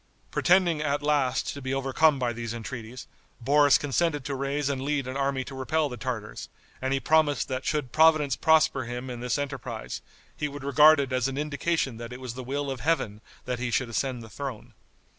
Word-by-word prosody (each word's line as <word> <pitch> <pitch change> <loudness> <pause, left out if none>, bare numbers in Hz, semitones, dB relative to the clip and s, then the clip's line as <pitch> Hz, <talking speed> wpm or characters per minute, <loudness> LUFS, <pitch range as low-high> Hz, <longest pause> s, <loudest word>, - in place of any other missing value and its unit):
Pretending, 175 -4 +3
at 145 -1 -1
last, 140 -4 +1
to 140 - -8
be 130 0 -2
overcome 135 +3 +3
by 125 -2 -1
these 115 0 -5
entreaties, 115 +1 -7 0.3
Boris 145 +3 +5
consented 145 0 0
to 140 - -3
raise 140 +1 -1
and 140 -2 -1
lead 140 0 -1
an 130 - -5
army 135 -1 0
to 135 - -10
repel 145 +4 0
the 125 - -6
Tartars, 120 -5 -5 0.3
and 130 0 -1
he 135 - +2
promised 155 -1 +2
that 130 -1 -3
should 150 -5 -1
Providence 155 -2 +4
prosper 155 -5 +3
him 125 +2 -5
in 120 - -6
this 125 +3 -1
enterprise, 130 -5 -5 0.3
he 150 - -2
would 145 -1 -8
regard 150 +2 +6
it 135 -2 -2
as 130 0 +1
an 135 0 -4
indication 150 -3 -1
that 115 0 -7
it 125 - -7
was 130 -3 -6
the 130 +1 -7
will 140 +2 -2
of 130 - -5
Heaven 125 -7 0 0.2
that 125 -1 -3
he 125 0 -2
should 120 +2 0
ascend 125 0 -2
the - - -10
throne. 130 -2 -7
135 Hz, 205 wpm, -27 LUFS, 125-145 Hz, 0.3 s, regard